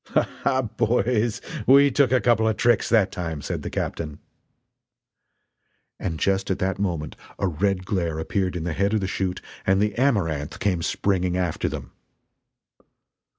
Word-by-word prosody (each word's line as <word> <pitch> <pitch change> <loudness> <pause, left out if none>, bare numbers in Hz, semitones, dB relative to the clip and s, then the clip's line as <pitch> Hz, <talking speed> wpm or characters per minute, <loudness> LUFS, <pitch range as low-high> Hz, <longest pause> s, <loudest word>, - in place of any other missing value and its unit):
"Ha - - +5 0.2
ha, 130 -1 +2
boys, 115 0 0 0.3
we 140 +2 +7
took 130 -1 +3
a 130 - +4
couple 115 -3 +3
of 110 -2 0
tricks 120 -3 +3
that 105 -5 +3
time!" 80 -5 -4
said - - -4
the - - -5
captain. 75 -3 -4 1.8
And 85 -4 -3
just 95 0 +1
at 95 - 0
that 95 +1 -1
moment 85 -6 -2 0.2
a - - -1
red 95 +2 0
glare 90 -6 -1
appeared 90 +3 -1
in 85 - -3
the 85 -1 -2
head 100 +5 +1
of - - +2
the - - -1
chute 95 -1 -2 0.2
and 95 0 +3
the 105 0 +1
Amaranth 80 - 0
came 95 -4 0
springing 90 0 0
after 90 -3 -1
them! - - -7
95 Hz, 160 wpm, -24 LUFS, 90-110 Hz, 1.8 s, we